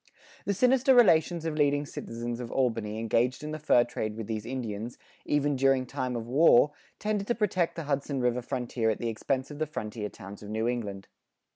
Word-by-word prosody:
[43:1] - - -27
The 200 - +1
sinister 255 +4 +4
relations 170 -7 +4
of 160 - -1
leading 145 -1 +2
citizens 120 -3 -5
of 120 -2 -6
Albany 115 -5 0
engaged 115 +4 0
in 150 - -4
the 155 - -4
fur 125 -5 +4
trade 110 -2 -4
with 115 - -4
these 110 0 -4
Indians, 120 -3 -4 0.3
even 145 -1 +1
during 135 -1 +3
time 130 -1 -3
of 115 -1 -3
war, 145 +1 +5 0.3
tended 210 -1 -2
to 240 - +1
protect 185 -6 0
the 165 - -4
Hudson 140 -1 -1
River 125 0 +1
frontier 120 -2 -1
at 110 - 0
the 120 - -2
expense 130 +5 -2
of 145 - -8
the 155 - 0
frontier 105 -7 -5
towns 100 -1 -11
of 105 - -9
New 110 +2 -1
England. 105 -5 -3
130 Hz, 200 wpm, -28 LUFS, 115-150 Hz, 0.3 s, war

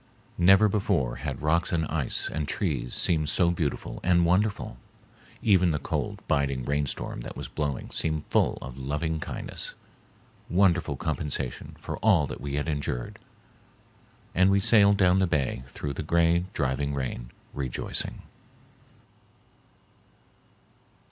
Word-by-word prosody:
Never 95 +4 +6
before 95 - 0
had - - -5
rocks 85 +3 +2
and 80 -3 +1
ice 75 -4 0
and 75 -1 -3
trees 70 - -2
seemed 80 -3 +1
so 85 +1 +3
beautiful 80 -5 -3
and 85 -1 +3
wonderful, 95 - +1 0.7
even 95 -5 +4
the 75 - +1
cold, - - -3
biting 70 -3 0
rainstorm 70 0 -2
that - - -8
was - - -5
blowing 70 -3 -3
seemed 80 -1 -1
full - - +2
of 65 +1 -8
loving 75 +4 -2
kindness, - - -4 0.7
wonderful 90 -5 +3
compensation 75 -4 -3
for - - -5
all 95 -9 +4
that 65 - -7
we 70 0 -3
had 75 +2 -1
endured, 70 -5 -3 1.1
and 95 +2 +4
we 100 0 +4
sailed 100 -1 +5
down 95 -1 +4
the 95 - +3
bay 70 -7 0
through 70 +1 -5
the - - -4
gray, 85 +1 +2
driving 70 0 -1
rain 65 -3 -4 0.2
rejoicing. 65 -3 -2
80 Hz, 130 wpm, -27 LUFS, 70-90 Hz, 1.1 s, Never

